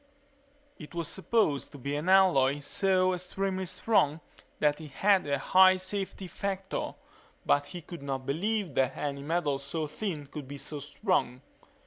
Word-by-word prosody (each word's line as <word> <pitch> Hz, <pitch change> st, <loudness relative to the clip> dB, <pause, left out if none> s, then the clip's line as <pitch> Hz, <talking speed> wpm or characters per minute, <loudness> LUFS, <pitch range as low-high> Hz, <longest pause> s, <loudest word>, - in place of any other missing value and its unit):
It 155 Hz, +1 st, -11 dB
was 170 Hz, -2 st, -2 dB
supposed 190 Hz, -8 st, 0 dB
to -, -, -8 dB
be 140 Hz, +2 st, -3 dB
an 150 Hz, +5 st, -2 dB
alloy 160 Hz, -8 st, +5 dB
so 185 Hz, +4 st, +2 dB
extremely 185 Hz, +1 st, -2 dB
strong 165 Hz, -6 st, +2 dB, 0.4 s
that 150 Hz, +1 st, +1 dB
it 155 Hz, -, -8 dB
had 190 Hz, +4 st, +3 dB
a 140 Hz, 0 st, +1 dB
high 185 Hz, 0 st, +6 dB
safety 190 Hz, +1 st, -4 dB
factor 195 Hz, +1 st, -4 dB, 0.5 s
but 145 Hz, 0 st, +3 dB
he 175 Hz, -2 st, -8 dB
could 170 Hz, -2 st, -9 dB
not 135 Hz, -2 st, -4 dB
believe 190 Hz, +5 st, -1 dB
that 130 Hz, -1 st, +1 dB
any 140 Hz, -1 st, -3 dB
metal 145 Hz, -2 st, 0 dB
so 145 Hz, +3 st, -3 dB
thin 155 Hz, -1 st, -4 dB
could 140 Hz, -1 st, -8 dB
be 140 Hz, +1 st, -7 dB
so 150 Hz, +1 st, -5 dB
strong. 145 Hz, -, -1 dB
165 Hz, 155 wpm, -29 LUFS, 145-190 Hz, 0.5 s, high